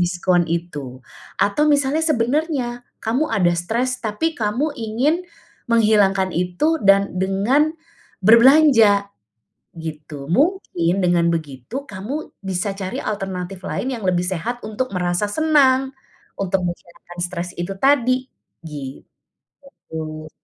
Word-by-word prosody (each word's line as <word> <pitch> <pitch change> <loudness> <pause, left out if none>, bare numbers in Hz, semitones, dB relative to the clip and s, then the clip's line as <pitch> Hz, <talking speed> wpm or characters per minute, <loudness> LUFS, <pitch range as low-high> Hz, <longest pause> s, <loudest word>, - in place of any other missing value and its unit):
diskon 175 -1 +1
itu. 145 -7 -5 0.3
Atau 205 +10 +2
misalnya 285 +1 +2
sebenarnya 275 -3 0 0.2
kamu 255 +8 0
ada 175 -3 +2
stres 235 +9 -1
tapi 225 +10 -1
kamu 245 +6 -1
ingin 255 +7 0 0.5
menghilangkan 205 -5 +3
itu 180 - 0
dan 195 0 +4
dengan 245 - +1 0.5
berbelanja, 230 -4 +6 0.6
gitu. 155 -2 -7
Mungkin 195 - +1
dengan 175 -1 +3
begitu 165 - -3
kamu 220 +11 -5
bisa 195 0 -2
cari 195 -1 -5
alternatif 190 -2 -4
lain 265 - -2
yang 190 - -4
lebih 180 -1 +2
sehat 195 +7 -3
untuk 215 0 -4
merasa 175 +3 0
senang. 270 0 +3 0.5
Untuk 195 -1 0
menghilangkan 175 0 -7
stres 175 0 -3
itu 195 +3 -3
tadi, 255 +2 +2 1.4
gitu. 155 - -8
200 Hz, 110 wpm, -21 LUFS, 175-260 Hz, 1.4 s, berbelanja